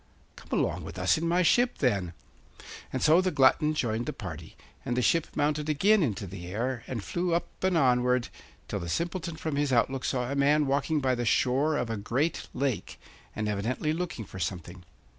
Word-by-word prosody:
'Come -, -, -3 dB
along -, -, -1 dB
with 80 Hz, -, -8 dB
us 95 Hz, +11 st, +2 dB
in 165 Hz, -, -1 dB
my 175 Hz, +2 st, +3 dB
ship, 240 Hz, +9 st, +3 dB
then.' 100 Hz, -, 0 dB, 0.8 s
And 130 Hz, -, -2 dB
so 160 Hz, +3 st, +6 dB
the 185 Hz, -, +1 dB
glutton 150 Hz, +1 st, +3 dB
joined 115 Hz, -3 st, -1 dB
the -, -, -2 dB
party, 85 Hz, -4 st, -8 dB, 0.3 s
and 120 Hz, -, -2 dB
the -, -, +3 dB
ship 165 Hz, +8 st, +2 dB
mounted 150 Hz, +1 st, 0 dB
again 200 Hz, +8 st, +4 dB
into 105 Hz, -, -1 dB
the 90 Hz, -2 st, -8 dB
air, 120 Hz, +5 st, -3 dB
and 115 Hz, -5 st, -4 dB
flew 175 Hz, -, -1 dB
up 170 Hz, -, -4 dB
and 185 Hz, -2 st, +2 dB
onward, 125 Hz, -3 st, +2 dB, 0.4 s
till -, -, -3 dB
the 85 Hz, -, -5 dB
Simpleton 170 Hz, -, -2 dB
from 155 Hz, -2 st, -3 dB
his 145 Hz, -1 st, +1 dB
outlook 130 Hz, +2 st, +1 dB
saw 125 Hz, -1 st, -1 dB
a -, -, -1 dB
man 145 Hz, +2 st, +3 dB
walking 145 Hz, +3 st, 0 dB
by 130 Hz, -1 st, +2 dB
the 120 Hz, -1 st, -1 dB
shore 135 Hz, +6 st, +2 dB
of 120 Hz, -4 st, -2 dB
a 110 Hz, -, -2 dB
great 130 Hz, +10 st, -1 dB
lake, 130 Hz, -4 st, -3 dB, 0.4 s
and 105 Hz, -, -2 dB
evidently 115 Hz, +9 st, -1 dB
looking 165 Hz, -9 st, -4 dB
for 95 Hz, -, -10 dB
something. 90 Hz, +1 st, -5 dB
130 Hz, 200 wpm, -28 LUFS, 110-155 Hz, 0.8 s, so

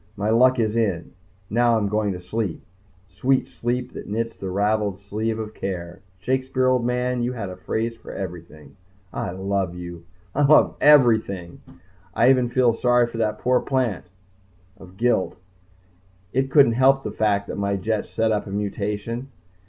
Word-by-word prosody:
My 105 Hz, +2 st, 0 dB
luck 130 Hz, +3 st, +5 dB
is 110 Hz, -2 st, 0 dB
in. 100 Hz, -7 st, -1 dB, 0.4 s
Now 120 Hz, +2 st, +3 dB
I'm 105 Hz, -2 st, 0 dB
going 105 Hz, 0 st, 0 dB
to 90 Hz, -, -6 dB
sleep 90 Hz, 0 st, -4 dB, 0.4 s
sweet 130 Hz, +6 st, 0 dB
sleep 125 Hz, +1 st, -3 dB
that -, -, -8 dB
knits 115 Hz, +2 st, -3 dB
the 95 Hz, -, -6 dB
ravelled 100 Hz, 0 st, 0 dB
sleeve 110 Hz, +3 st, -3 dB
of 110 Hz, -1 st, -6 dB
care 90 Hz, -3 st, -5 dB, 0.2 s
Shakespeare, 130 Hz, +5 st, -1 dB
old 130 Hz, -1 st, +3 dB
man, 125 Hz, 0 st, 0 dB
you 120 Hz, +1 st, -1 dB
had 100 Hz, -6 st, -5 dB
a -, -, -7 dB
phrase 115 Hz, +5 st, -3 dB
for 115 Hz, -, -11 dB
everything! 85 Hz, -2 st, -8 dB, 0.4 s
I -, -, -3 dB
love 95 Hz, -1 st, -2 dB
you. 85 Hz, -1 st, -8 dB, 0.3 s
I 145 Hz, -, 0 dB
love 145 Hz, +2 st, +5 dB
everything. 110 Hz, -11 st, +4 dB, 0.5 s
I 125 Hz, +3 st, +5 dB
even 125 Hz, -2 st, +2 dB
feel 125 Hz, -1 st, +3 dB
sorry 120 Hz, +1 st, +3 dB
for 120 Hz, -1 st, -7 dB
that 105 Hz, -1 st, 0 dB
poor 125 Hz, +2 st, +2 dB
plant... 125 Hz, -9 st, -1 dB, 0.7 s
of 95 Hz, 0 st, -14 dB
guilt. 120 Hz, -6 st, +1 dB, 1.0 s
It 135 Hz, +1 st, +1 dB
couldn't 140 Hz, -4 st, +6 dB
help 135 Hz, +3 st, +3 dB
the -, -, -4 dB
fact 105 Hz, -1 st, +1 dB
that -, -, -6 dB
my 100 Hz, 0 st, 0 dB
jets 105 Hz, +2 st, -2 dB
set 110 Hz, 0 st, 0 dB
up 105 Hz, 0 st, -1 dB
a -, -, -7 dB
mutation. 105 Hz, +4 st, -3 dB
110 Hz, 170 wpm, -23 LUFS, 100-125 Hz, 1.0 s, couldn't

